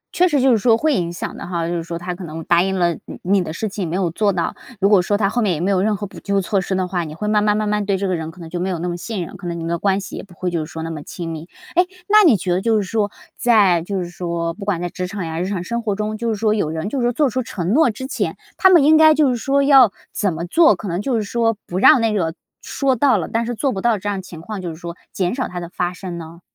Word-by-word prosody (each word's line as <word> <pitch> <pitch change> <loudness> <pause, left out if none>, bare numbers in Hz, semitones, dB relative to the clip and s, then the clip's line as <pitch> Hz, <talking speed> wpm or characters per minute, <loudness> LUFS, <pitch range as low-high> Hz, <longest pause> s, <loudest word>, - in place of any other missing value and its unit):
确 360 - +4
实 295 -5 +2
就 265 0 +4
是 230 - +3
说 225 +1 +4
会 310 +5 +1
影 175 -6 -1
响 175 - -5
的 - - -7
哈， 170 -2 -2
就 170 - -2
是 170 - -1
说 170 +1 -5
他 175 +1 -4
可 180 +2 -9
能 165 -1 -6
答 170 +2 +3
应 190 +1 0
了 175 -1 +2
你 - - -9
你 190 +1 +2
的 155 - -5
事 195 +7 -3
情， 200 -3 -4
没 170 - -2
有 185 -3 0
做 205 +4 +1
到， 170 -3 -2 0.2
如 195 - +3
果 200 -2 +5
说 205 +3 0
他 205 -1 +2
后 240 +5 0
面 195 -6 +1
也 - - -5
没 185 +4 0
有 185 -2 +2
任 210 +1 +1
何 205 - -4
补 195 - -10
救 200 0 0
措 195 +1 0
施 190 +1 -2
的 185 -1 0
话， 180 -1 -2
你 155 -1 -7
会 210 +5 -4
慢 210 0 +2
慢 210 0 +2
慢 215 0 -1
慢 210 0 0
对 200 -1 0
这 195 +1 -2
个 185 - 0
人 160 -1 -4
可 170 +3 -14
能 165 - -8
就 175 +2 -5
没 185 +2 -1
有 180 - -2
那 170 +2 -3
么 175 - -2
信 180 0 -4
任， - - -11
可 180 - -7
能 170 -1 -3
你 - - -5
们 165 - -3
的 170 - -1
关 195 +1 +1
系 195 - -8
也 - - -5
不 185 -3 -16
会 180 +1 -3
就 165 -2 -1
是 155 - -10
说 160 0 -5
那 165 - -4
么 155 -2 -6
亲 165 +2 -6
密。 160 +2 -7 0.2
哎， 360 - +5 0.2
那 425 +1 +6
你 290 - +6
觉 180 0 -3
得 180 - 0
就 225 +1 +2
是 - - -1
说 205 +1 -1 0.3
在 205 -8 +4
就 185 +2 -3
是 - - -5
说 170 -1 -3
不 200 - -9
管 200 -4 0
在 175 - -1
职 180 +1 -4
场 195 -1 -5
呀 160 0 -4
日 180 - -1
常 190 -3 -3
生 235 +5 -3
活 210 -3 -1
中， 215 +1 -2
就 230 +2 -2
是 220 - 0
说 215 +1 +1
有 205 -8 0
人 160 +5 -3
就 270 - -2
是 - - 0
说 - - +2
做 290 +4 +2
出 255 - -1
承 185 -7 -4
诺 315 +2 +5
之 250 +4 -5
前， 270 - -2 0.2
他 380 - +5
们 345 -6 +6
应 310 +2 +6
该 315 0 +7
就 295 -3 +4
是 - - 0
说 275 +4 +1
要 270 -6 +7 0.2
怎 200 -3 0
么 165 +1 -4
做， 320 - +5
可 190 +3 -7
能 175 +1 -2
就 250 +3 -1
是 220 - 0
说 225 +1 0
不 180 - -3
让 235 - +7
那 225 -1 +1
个 165 -5 -1 0.3
说 270 -2 0
到 255 -1 +3
了 175 - -3
但 230 0 -1
是 240 - -3
做 270 +4 0
不 195 -5 -4
到 235 0 +2
这 205 - -6
样 200 -2 -1
情 175 -3 -11
况， 205 +2 -6
就 180 - -4
是 160 - -7
说 170 +1 -7 0.2
减 180 0 -1
少 255 0 -2
它 180 - -6
的 170 -1 -7
发 180 0 -2
生 180 -1 -7
呢？ 165 +1 -10
195 Hz, 360 characters per minute, -20 LUFS, 175-225 Hz, 0.3 s, 该